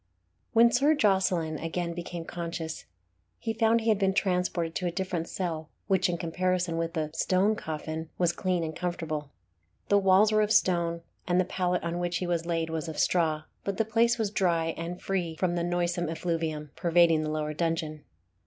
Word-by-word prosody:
When 235 +1 +6
Sir 285 +6 +4
Jocelyn 185 - +1
again 170 +1 -3
became 170 -1 -6
conscious, 165 -2 -5 0.5
he 225 - -3
found 225 +1 +3
he 225 - 0
had 215 -2 +3
been 190 -1 +2
transported 180 -4 0
to 180 - -2
a - - -1
different 180 -2 -3
cell, 165 -4 -3 0.2
which, 190 -2 +2
in 175 - -1
comparison 180 0 -1
with 165 0 -2
the 155 -3 -2
"Stone 190 +5 +2
Coffin," 155 0 -5
was 175 -2 +3
clean 180 -1 0
and 160 -1 -4
comfortable. 160 -4 -3 0.6
The 205 - +5
walls 195 +2 +5
were 215 0 +4
of 210 0 +1
stone, 170 -5 +2 0.3
and 175 +1 +3
the 185 - +3
pallet 180 -1 -1
on 170 +1 -2
which 175 -1 -1
he 185 - -3
was 170 -1 -1
laid 165 -1 -1
was 160 0 -3
of 160 - -6
straw, 160 -3 +2 0.2
but 200 -1 -3
the 225 - +2
place 230 +2 +3
was 215 -3 -1
dry, 170 -5 +1
and 170 +2 -5
free 180 -4 -2
from 175 +1 0
the 170 -1 -1
noisome 175 -1 0
effluvium 160 -3 -2
pervading 170 -2 +4
the 155 - -2
lower 155 0 -2
dungeon. 160 -2 -2
175 Hz, 190 wpm, -28 LUFS, 165-190 Hz, 0.6 s, When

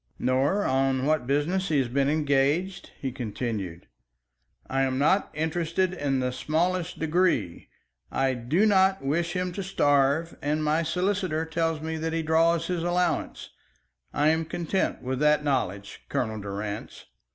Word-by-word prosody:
"Nor 135 +11 +1
on 135 0 +1
what 155 -4 +1
business 165 +8 0
he 155 - +2
has 135 -3 +2
been 135 +3 +1
engaged?" 150 +5 +1
he 135 - -3
continued. 110 -7 -4 0.8
"I 135 0 0
am 130 -1 0
not 185 +8 +2
interested 165 +3 0
in 140 -6 -1
the 125 0 -1
smallest 170 +6 -1
degree. 160 - 0 0.4
I 135 0 +1
do 130 - +1
not 190 -4 +3
wish 170 +5 0
him 180 0 -1
to 195 - -5
starve, 145 -3 +2
and 150 +2 0
my 155 +2 +2
solicitor 180 -1 -1
tells 165 -1 -1
me 160 0 -3
that 160 +1 -3
he 165 0 -1
draws 165 +1 +3
his 175 -1 -2
allowance. 175 -1 -1 0.6
I 150 +1 +2
am 160 +1 +1
content 175 +3 -2
with 130 0 -2
that 150 0 +3
knowledge, 100 -8 -2
Colonel 110 -3 -2
Durrance." 100 +1 -6
155 Hz, 150 wpm, -26 LUFS, 135-170 Hz, 0.8 s, not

